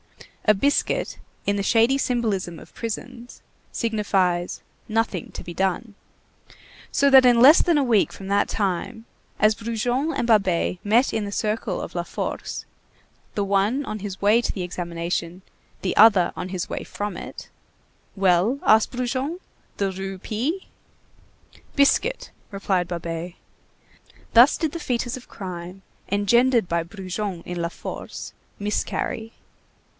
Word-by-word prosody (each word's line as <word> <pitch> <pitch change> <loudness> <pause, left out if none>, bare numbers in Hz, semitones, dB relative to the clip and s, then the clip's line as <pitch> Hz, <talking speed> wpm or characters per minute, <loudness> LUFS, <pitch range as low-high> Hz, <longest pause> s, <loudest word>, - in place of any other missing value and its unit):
A 215 - +5
biscuit, 285 +9 0 0.3
in 200 - +1
the 200 - -1
shady 230 +6 +4
symbolism 215 -10 -1
of - - -15
prisons, 240 +2 -6 0.3
signifies: 195 -6 0 0.3
Nothing 220 -5 -1
to - - -7
be 175 - -7
done. 195 +5 -1 1.0
So 280 - +3
that 265 -1 +9
in 240 -1 +6
less 280 +7 +8
than 340 -3 +3
a 285 - +3
week 230 -6 +3
from 195 - -9
that 200 +1 +2
time, 205 +3 -2 0.3
as 215 0 +5
Brujon 240 +7 -1
and 235 - -1
Babet 190 -5 +2
met 230 +6 +3
in 220 - 0
the 200 - -4
circle 215 +2 -1
of - - -6
La - - 0
Force, - - -5 0.7
the 205 - 0
one 200 +8 +1
on 215 - -4
his 195 -1 -6
way 210 +4 +4
to - - -1
the 185 - -4
examination, 170 0 -4 0.4
the 185 - -1
other 205 -5 +6
on 185 - -5
his 185 -1 -3
way - - -4
from 205 0 -5
it:— - - -8 0.7
"Well?" 195 +6 +3
asked 220 0 +4
Brujon, 260 +6 -2 0.4
"the 195 -1 0
Rue 190 0 -5
P.?" 260 - -3 1.1
"Biscuit," 290 - +2 0.2
replied 195 -3 -1
Babet. 170 0 -4 1.0
Thus 240 +4 +7
did 320 -3 -1
the 335 - -4
fœtus 245 -3 -2
of 255 - -12
crime 185 -1 -7 0.3
engendered 235 +2 +3
by 170 -1 0
Brujon 185 0 -5
in 175 -1 -4
La 170 - -1
Force - - -7 0.3
miscarry. 210 +2 -2
210 Hz, 140 wpm, -24 LUFS, 185-240 Hz, 1.1 s, that